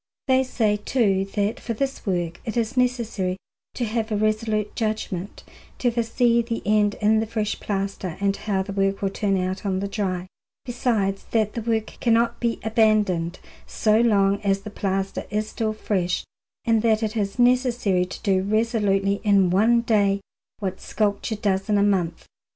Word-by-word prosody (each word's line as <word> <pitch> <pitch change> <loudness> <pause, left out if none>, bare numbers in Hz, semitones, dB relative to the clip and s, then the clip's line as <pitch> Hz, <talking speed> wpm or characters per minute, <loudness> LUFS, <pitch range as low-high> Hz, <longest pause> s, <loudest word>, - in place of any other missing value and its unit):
They 260 0 +4
say, 220 -5 +1
too, 205 -4 +1
that 205 +1 0
for 230 - -4
this 270 0 -3
work 175 -3 -1
it 225 +1 -4
is 230 +2 -1
necessary 230 -7 0 0.4
to 245 - -1
have 225 0 -2
a - - +1
resolute 215 0 0
judgment, 215 -4 -3 0.3
to 245 - +1
foresee 235 0 +2
the 230 0 -4
end 210 0 +3
in 215 +1 +4
the 220 - -1
fresh 215 -1 -2
plaster 195 -3 -3
and 200 0 +1
how 195 -3 -1
the 195 +1 -6
work 195 0 0
will 195 - +1
turn 195 -1 0
out 185 +1 -2
on 190 -2 -1
the 200 - -2
dry; 185 -3 -2 0.4
besides 225 -6 -1
that 215 -2 +1
the 230 - -3
work 225 -1 -2
cannot 230 0 +2
be 235 -1 0
abandoned 210 -6 +2 0.3
so 215 0 +2
long 200 -4 +3
as 195 -1 +1
the 210 +1 -8
plaster 195 -1 -2
is 215 +1 -1
still 220 0 -2
fresh, 185 -5 -1 0.4
and 225 -1 +3
that 225 -1 +2
it 215 +1 -2
is 200 -1 -2
necessary 245 -7 +2
to 180 - -8
do 190 -2 +2
resolutely 200 -2 +1
in 200 -4 +4
one 225 +5 +4
day 205 -4 +2 0.4
what 190 -3 -4
sculpture 210 +1 -1
does 200 -1 -1
in 210 - +3
a 200 - +3
month. 180 -5 0
210 Hz, 175 wpm, -24 LUFS, 195-225 Hz, 0.4 s, They